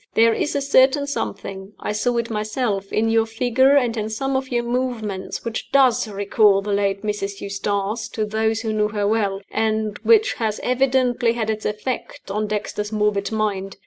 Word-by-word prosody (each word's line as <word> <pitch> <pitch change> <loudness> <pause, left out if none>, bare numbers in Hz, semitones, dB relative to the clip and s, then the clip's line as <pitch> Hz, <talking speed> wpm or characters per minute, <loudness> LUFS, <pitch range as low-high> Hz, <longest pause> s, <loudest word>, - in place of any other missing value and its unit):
There 230 0 +5
is 295 - -1
a 285 - +1
certain 275 +1 +4
something 195 -7 -5
I - - -3
saw 240 +3 0
it 235 0 -2
myself 215 -2 -2
in 220 +1 +1
your 225 0 +3
figure, 250 +5 +3
and 245 -4 +1
in 215 -1 -2
some 270 +5 -2
of 265 0 -1
your 240 -1 +1
movements, 235 -6 -3
which 230 -1 -4
does 250 -4 +4
recall 200 0 +3
the 205 0 -2
late 200 0 0
Mrs. 200 -1 -3
Eustace 200 +2 -2
to 215 - -2
those 220 +1 0
who 220 -2 -2
knew 210 -1 +2
her 205 -1 -1
well, 200 -3 0
and 220 -1 -1
which 440 -2 +4
has 220 -2 -2
evidently 250 -2 +2
had 220 -2 -1
its 215 0 -3
effect 210 -1 -5
on 210 +1 -1
Dexter's 210 0 -3
morbid 210 -1 0
mind. 200 -3 -2
220 Hz, 180 wpm, -22 LUFS, 205-245 Hz, -, There